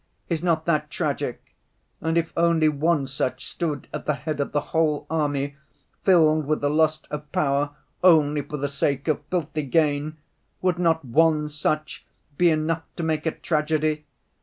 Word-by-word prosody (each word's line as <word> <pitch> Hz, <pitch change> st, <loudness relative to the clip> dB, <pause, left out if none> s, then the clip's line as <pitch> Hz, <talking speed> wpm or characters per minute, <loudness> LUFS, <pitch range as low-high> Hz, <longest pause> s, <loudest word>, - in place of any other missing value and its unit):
Is 165 Hz, -3 st, -1 dB
not 165 Hz, -3 st, +1 dB
that 150 Hz, -3 st, +1 dB
tragic? 145 Hz, -6 st, -3 dB, 0.5 s
And 160 Hz, +1 st, 0 dB
if 165 Hz, -1 st, 0 dB
only 165 Hz, -2 st, +3 dB
one 150 Hz, 0 st, +1 dB
such 130 Hz, -1 st, -3 dB
stood 160 Hz, -4 st, -3 dB
at -, -, -5 dB
the 150 Hz, -, +2 dB
head 150 Hz, +2 st, -4 dB
of 140 Hz, -, -1 dB
the 150 Hz, -, +1 dB
whole 155 Hz, -3 st, +2 dB
army 145 Hz, -3 st, -1 dB, 0.5 s
'filled 155 Hz, -5 st, +4 dB
with 155 Hz, 0 st, +1 dB
the 145 Hz, 0 st, +1 dB
lust 155 Hz, 0 st, +2 dB
of 150 Hz, 0 st, -6 dB
power 145 Hz, 0 st, 0 dB, 0.3 s
only 150 Hz, -4 st, +5 dB
for 150 Hz, +1 st, -6 dB
the 145 Hz, 0 st, -1 dB
sake 140 Hz, 0 st, -1 dB
of 155 Hz, -2 st, 0 dB
filthy 155 Hz, -4 st, -1 dB
gain'—would 155 Hz, +4 st, -1 dB
not 165 Hz, -3 st, +2 dB
one 150 Hz, +3 st, +3 dB
such 155 Hz, +1 st, -2 dB, 0.3 s
be 175 Hz, +3 st, +4 dB
enough 160 Hz, +1 st, 0 dB
to 170 Hz, -, -4 dB
make 160 Hz, 0 st, -1 dB
a -, -, +2 dB
tragedy? 155 Hz, -1 st, 0 dB
155 Hz, 160 wpm, -24 LUFS, 145-160 Hz, 0.5 s, only